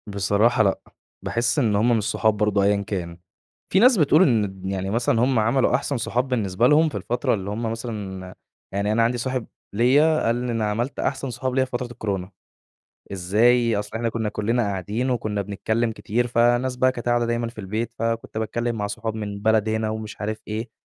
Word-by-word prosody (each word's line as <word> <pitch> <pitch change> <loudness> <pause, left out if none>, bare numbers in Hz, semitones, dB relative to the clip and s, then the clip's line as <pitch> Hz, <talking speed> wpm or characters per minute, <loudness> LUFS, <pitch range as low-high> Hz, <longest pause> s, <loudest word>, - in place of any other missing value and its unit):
بصراحة 105 +4 +2
لأ 100 -2 +1 0.4
باحس 115 +2 0
إن 110 -6 +2
هم 115 +3 +3
مش 110 - -1
صحاب 110 0 +1
برضو 105 -1 +2
أيًا 100 0 +2
كان. 85 -5 -4 0.6
في 190 - +5
ناس 245 +2 +6
بتقول 155 +1 +5
إن 105 - +1
يعني 95 0 -2
مثلًا 115 +1 +1
هم 130 -2 +2
عملوا 125 +4 +2
أحسن 140 +1 -1
صحاب 125 +2 -1
بالنسبة 115 -3 +1
لهم 155 +3 +4
في 120 - -10
الفترة 115 +5 -1
اللي 100 -2 -3
هم 110 +2 -2
مثلًا، 100 -5 -6 0.4
يعني 100 +1 0
أنا 115 +1 +3
عندي 120 +2 +1
صاحب 130 0 -3 0.3
ليَّ 145 +8 +4
قال 115 - +2
لي 125 0 -2
أنا 115 -2 -1
عملت 120 +6 -2
أحسن 135 0 -2
صحاب 125 +2 -3
ليَّ 130 -1 +3
في 130 - -18
فترة 125 0 -3
الكورونا. 100 -5 -4 0.8
إزاي؟ 115 +5 +3
أصل 105 +1 -4
إحنا 115 0 -1
كنّا 110 -1 -2
كلنا 115 +4 0
قاعدين 105 +5 -2
وكنّا 110 -4 -1
بنتكلّم 110 +4 -1
كتير، 120 +2 -1
فناس 120 +2 +2
بقى 130 +1 +3
قاعدة 120 -1 0
دايمًا 120 0 -1
في 115 - -11
البيت، 110 +4 -3
فكنت 115 -1 -2
باتكلّم 120 +2 -2
مع 105 -2 -2
صحاب 110 +1 -4
من 105 -2 -5
بلد 110 0 +2
هنا 110 0 -1
ومش 110 -1 -6
عارف 110 +1 -3
إيه 110 +3 -4
115 Hz, 195 wpm, -23 LUFS, 105-120 Hz, 0.8 s, ناس